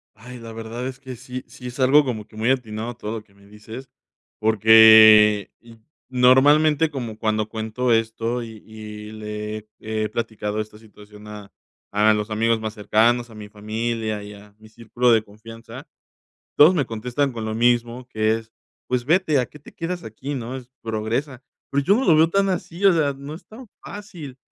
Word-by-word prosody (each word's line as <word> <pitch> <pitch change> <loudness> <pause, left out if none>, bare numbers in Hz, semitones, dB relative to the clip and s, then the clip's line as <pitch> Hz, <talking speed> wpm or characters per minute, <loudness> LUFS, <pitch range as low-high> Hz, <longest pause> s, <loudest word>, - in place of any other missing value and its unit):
Ay, 125 +2 -11
la 115 -1 -10
verdad 115 +2 -6
es 130 0 -6
que 130 -2 -9
sí, 125 +2 -8
sí, 125 - -12
es 125 - -10
algo 140 +3 +5
como 110 -5 -4
que - - -18
muy 110 +3 0
atinado 120 -2 -2
todo 110 -2 -6
lo 105 - -13
que 100 - -29
me 100 0 -21
dices 110 +6 -11 0.5
porque 110 -1 +7
y 115 -1 -17 0.3
normalmente 145 +5 +4
como 120 -7 -6
cuando 110 -1 -1
cuento 110 +3 -2
esto 115 +2 -1
y 110 -2 -10
y 105 -1 -10
le 105 0 -6
he 110 0 -16 0.4
he - - -2
platicado 110 -2 -4
esta 110 0 -8
situación 105 -1 -16
a 105 -1 -11 0.4
a 105 +1 +4
los 105 +1 -3
amigos 115 +1 +1
más 110 -1 -5
cercanos, 115 +3 +1
a - - -14
mi 105 -1 -10
familia 110 +1 -4
y 105 0 -10
a 105 0 -16
mi 110 0 -17
círculo 115 +2 -1
de 115 -2 +4
confianza, 115 +2 -12 0.7
todos 155 +5 +7
me 150 -6 +1
contestan 125 +5 -2
con 115 -2 -6
lo 110 0 -3
mismo 120 +1 0
que 110 -2 0
es: 115 0 -11 0.4
"Pues 125 -1 -1
vete 160 -2 +2
¿a 125 - 0
qué 150 - -15
te 145 - -16
quedas 175 +1 -5
aquí, 130 +6 -6
no?". 125 0 -5
Es, 125 -2 -11
"progresa". 115 +5 -3 0.3
Pero 140 0 0
yo 195 - +4
no 265 - 0
lo 165 - +5
veo 160 +1 +5
tan 195 +2 +1
así, 185 0 -4
o 195 - +7
sea, 155 -4 +1
no 140 +2 -9
es 170 +2 -13
tan 240 +5 -13 0.2
fácil. 175 -10 -9
115 Hz, 195 wpm, -22 LUFS, 110-130 Hz, 0.7 s, porque